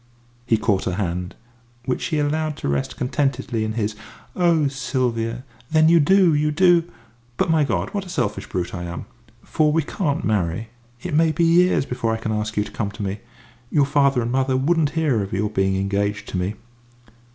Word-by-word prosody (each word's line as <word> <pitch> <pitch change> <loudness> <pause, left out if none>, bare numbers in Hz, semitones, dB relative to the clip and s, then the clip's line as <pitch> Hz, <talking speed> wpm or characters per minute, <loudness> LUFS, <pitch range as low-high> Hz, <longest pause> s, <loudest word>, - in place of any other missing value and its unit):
He 115 - +3
caught 105 -3 0
her 90 - -1
hand, 90 -2 -3 0.5
which 130 - -1
she 155 - -1
allowed 150 +1 -1
to - - -4
rest 70 -1 -2
contentedly 130 -3 -1
in 110 0 -2
his. 110 -2 -2 0.4
"Oh, 170 -4 +3
Sylvia! 125 -3 -2 0.3
Then 155 0 +4
you 170 0 +6
do 180 +2 +5
you 150 +1 +2
do! 175 +1 +4 0.5
But, - - +1
my 160 -2 +4
God, 145 - -1
what 200 -2 -2
a 185 - -11
selfish - - -2
brute 90 -1 -3
I 90 - -4
am! 85 0 -6 0.4
For 155 -2 +1
we 160 +1 +2
can't 145 -2 -2
marry. 105 +1 -1 0.3
It - - -4
may 160 +1 +4
be 155 +3 0
years 170 -2 +4
before 115 -3 -2
I 115 - 0
can 110 0 -3
ask 105 0 -2
you 105 - +3
to - - -10
come 105 -3 -2
to 105 - -6
me. 100 +1 -3 0.5
You 145 0 +3
father 140 -3 +2
and 120 - -2
mother 130 0 +1
wouldn't 155 +2 +2
hear 145 -9 +2
of 95 -1 -5
your 105 +2 -1
being 95 -2 +1
engaged 100 +2 -1
to - - -3
me." 90 +4 -2
130 Hz, 195 wpm, -22 LUFS, 105-155 Hz, 0.5 s, you